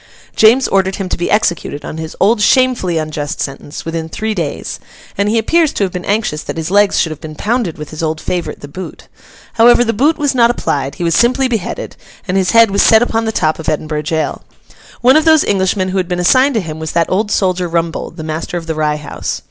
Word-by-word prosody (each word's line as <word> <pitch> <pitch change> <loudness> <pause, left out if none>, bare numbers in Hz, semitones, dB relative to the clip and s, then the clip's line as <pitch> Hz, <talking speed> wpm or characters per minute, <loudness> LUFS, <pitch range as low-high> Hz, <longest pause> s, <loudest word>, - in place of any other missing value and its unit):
James 235 +5 +5
ordered 190 -1 +1
him 195 - -4
to - - -1
be 175 - -3
executed, 170 -8 0
on - - -6
his 160 0 -6
old 210 +2 +3
shamefully 245 -7 +2
unjust 155 -2 -4
sentence, 140 +1 -6
within 165 0 -4
three 220 +5 -3
days; 165 -8 -4 0.4
and 200 +1 0
he 225 - +1
appears 320 +7 +2
to - - -1
have 190 - -1
been 180 0 -6
anxious 205 -7 -1
that - - -6
his 160 +2 -3
legs 205 0 +3
should 160 - +1
have 155 - -8
been 155 -2 -8
pounded 215 -2 -1
with 150 -1 -8
his 155 - -6
old 160 -1 -2
favourite 175 0 -4
the 145 - -8
boot. 180 +6 -9 0.5
However, 240 +1 +5
the 230 -1 0
boot 295 +9 +2
was 290 -2 0
not 235 -2 +4
applied; 140 - -2
he - - -5
was 170 -1 +1
simply 255 +3 +3
beheaded, 240 - -4 0.3
and 185 - -1
his 190 -2 +1
head 230 +1 +5
was 200 - +2
set 220 +1 +6
upon 225 -1 -1
the 220 - 0
top 155 -7 0
of 160 - -2
Edinburgh 155 0 -2
Jail. 155 0 -2 0.6
One 255 +3 +5
of 310 - +3
those 315 -2 +5
Englishmen 190 -1 0
who 190 - -2
had 185 -2 0
been 180 0 -2
assigned 260 +9 +3
to 220 - +1
him 160 -3 -7
was 160 0 -5
that 165 -1 +2
old 205 +3 0
soldier 185 -3 0
Rumbold, 165 -1 -2
the 160 - -6
master 160 +2 -4
of 165 - -6
the 160 - -2
Rye 155 -1 0
House. 150 - -5
185 Hz, 235 wpm, -15 LUFS, 160-225 Hz, 0.6 s, set